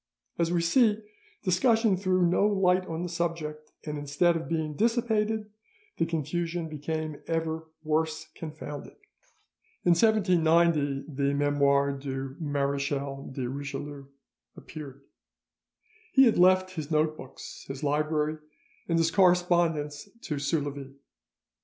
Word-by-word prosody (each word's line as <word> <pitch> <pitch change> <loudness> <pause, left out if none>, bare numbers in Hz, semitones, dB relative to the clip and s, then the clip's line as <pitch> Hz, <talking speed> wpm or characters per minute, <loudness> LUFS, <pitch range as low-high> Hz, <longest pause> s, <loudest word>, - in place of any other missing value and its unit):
As 170 0 +1
we 175 -1 +2
see, 210 +5 +4 0.5
discussion 215 +3 +3
threw 185 -1 +1
no 180 +4 +3
light 185 -2 +2
on 165 +1 -3
the - - -2
subject, 165 -3 -4
and 150 -1 -4
instead 145 +5 +2
of 165 -1 -4
being 160 -2 -1
dissipated, 220 - 0 0.5
the 165 - +1
confusion 165 +1 -2
became 155 0 -4
ever 160 -1 -2
"worse 155 0 -1
confounded." 155 -2 -8 0.9
In 175 - +5
1790 170 -7 +3
the 140 -1 -1
'Memoires 140 -1 +2
du 135 -1 -4
Marechal 140 -2 -2
de 130 -2 -3
Richelieu' 140 +1 -6 0.5
appeared. 140 -3 -9 1.1
He 265 - +7
had 230 -7 +4
left 185 +1 +5
his 155 -5 -6
note 155 0 +2
books, 130 -3 -10
his 135 +2 -6
library, 150 +1 0 0.5
and 170 - +1
his 165 0 +2
correspondence 175 -4 +2
to 150 -3 -3
Soulavie. 140 -2 -2
160 Hz, 120 wpm, -28 LUFS, 145-175 Hz, 1.1 s, He